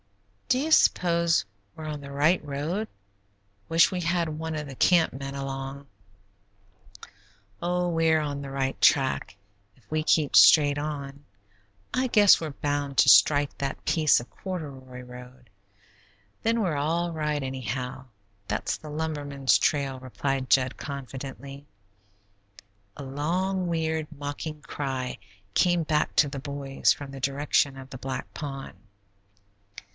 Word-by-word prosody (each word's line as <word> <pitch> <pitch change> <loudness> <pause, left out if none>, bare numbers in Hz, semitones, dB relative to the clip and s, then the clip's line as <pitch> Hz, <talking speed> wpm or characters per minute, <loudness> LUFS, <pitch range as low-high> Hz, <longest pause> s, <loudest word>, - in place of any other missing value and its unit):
"Do 250 - +4
you 310 +4 -2
s'pose 170 - +3 0.3
we're 160 - -8
on 150 -1 -5
the 140 0 -9
right 150 +6 +2
road? 150 +9 -3 0.8
Wish 165 +1 +5
we 180 -1 -2
had 170 0 0
one 160 +1 -4
of 150 -1 -4
the 135 - -9
camp 170 +4 +3
men 135 +1 -6
along." 135 0 -5 1.7
"Oh, 180 +1 0
we're 165 -2 +2
on 145 -2 -3
the 140 - -7
right 135 -1 -2
track. 130 -7 +2 0.4
If 110 -5 -28
we 155 0 0
keep 155 -2 +2
straight 145 -2 +7
on, 140 -2 -5 0.7
I 255 0 +1
guess 210 -6 +6
we're 160 - -3
bound 145 -1 -3
to - - +6
strike 145 -1 +5
that 140 -1 -4
piece 155 -3 +4
of 120 - -10
corduroy 135 -9 -7
road; 125 -1 -13 0.9
then 230 0 +1
we're 175 -7 0
all 165 +4 -1
right 150 -2 -1
anyhow; 130 0 -5 0.4
that's 105 - -1
the 155 - -11
lumbermen's 145 -3 0
trail," 140 -3 0
replied 130 0 -3
Jud 130 +2 +3
confidently. 140 0 -8 1.3
A 145 - -7
long, 175 +7 -1
weird, 160 -2 -1
mocking 150 +1 -6
cry 130 -5 -4 0.3
came 175 - +3
back 150 -1 0
to 145 - +5
the 140 0 -6
boys 140 -1 0
from 140 -1 -4
the 135 -1 -9
direction 140 0 +1
of 135 0 -11
the 130 - -8
black 130 -1 -5
pond. 135 -7 -6
145 Hz, 135 wpm, -26 LUFS, 135-160 Hz, 1.7 s, straight